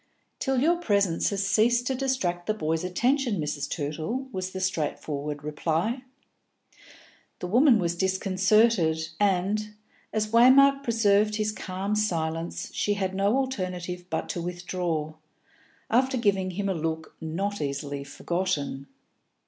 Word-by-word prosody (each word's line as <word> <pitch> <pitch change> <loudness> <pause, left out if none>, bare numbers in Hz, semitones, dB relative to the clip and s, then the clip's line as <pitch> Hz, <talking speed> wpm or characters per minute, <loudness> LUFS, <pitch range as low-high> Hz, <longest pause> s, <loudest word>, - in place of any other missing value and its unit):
"Till 265 -2 +1
your 340 +3 +3
presence 200 - +1
has 195 -1 -1
ceased 235 +4 +3
to 265 - 0
distract 250 -10 -1
the 215 - +1
boys' 160 -4 -1
attention, 240 +4 +1
Mrs. 150 -2 -3
Tootle," 165 - -3
was 185 -3 -3
the 190 - -6
straightforward 150 -5 -2
reply. 165 - -1 1.4
The - - -6
woman 240 +6 +5
was 175 -4 0
disconcerted, 190 -2 +2
and, 205 +2 +1 0.4
as 215 0 -1
Waymark 275 +4 +6
preserved 215 -3 +2
his 215 0 0
calm 195 0 -4
silence, 165 -5 -2
she 205 - 0
had 190 -2 -2
no 200 +5 +2
alternative 180 -9 -3
but - - -2
to 175 - -3
withdraw, 175 -3 -3 0.8
after 260 +2 +3
giving 195 -5 +1
him 195 +2 -3
a 195 - +1
look 160 -1 -4
not 190 +5 -3
easily 140 0 -3
forgotten. 145 -2 -2
190 Hz, 130 wpm, -27 LUFS, 165-215 Hz, 1.4 s, Waymark